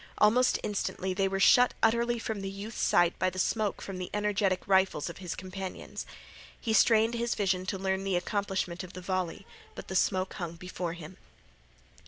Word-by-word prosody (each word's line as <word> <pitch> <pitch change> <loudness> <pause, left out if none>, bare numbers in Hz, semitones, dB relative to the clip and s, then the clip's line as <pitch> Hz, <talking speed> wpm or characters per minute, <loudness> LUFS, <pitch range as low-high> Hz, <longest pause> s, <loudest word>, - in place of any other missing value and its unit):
Almost 245 +4 +4
instantly 190 -2 -2
they 195 +1 +1
were 195 0 -2
shut 245 +5 +6
utterly 235 +1 +3
from 220 -3 -4
the 195 - -3
youth's 200 +3 -6
sight 175 0 +3
by 185 - +2
the 185 - -10
smoke 210 +2 0
from 190 -2 -6
the 180 - -4
energetic 205 -2 0
rifles 190 -5 +2
of - - -13
his 180 -3 -5
companions. 185 0 -6 0.5
He 225 - -1
strained 225 +1 +5
his 235 0 -1
vision 190 -2 0
to 195 - -1
learn 190 0 -1
the 195 -2 0
accomplishment 190 -2 -2
of 180 - -10
the 185 - -7
volley, 185 0 -2 0.3
but - - -9
the 190 - -4
smoke 185 0 +1
hung 170 -2 -5
before 180 -1 -5
him. 170 +1 -10
190 Hz, 185 wpm, -30 LUFS, 185-210 Hz, 0.5 s, shut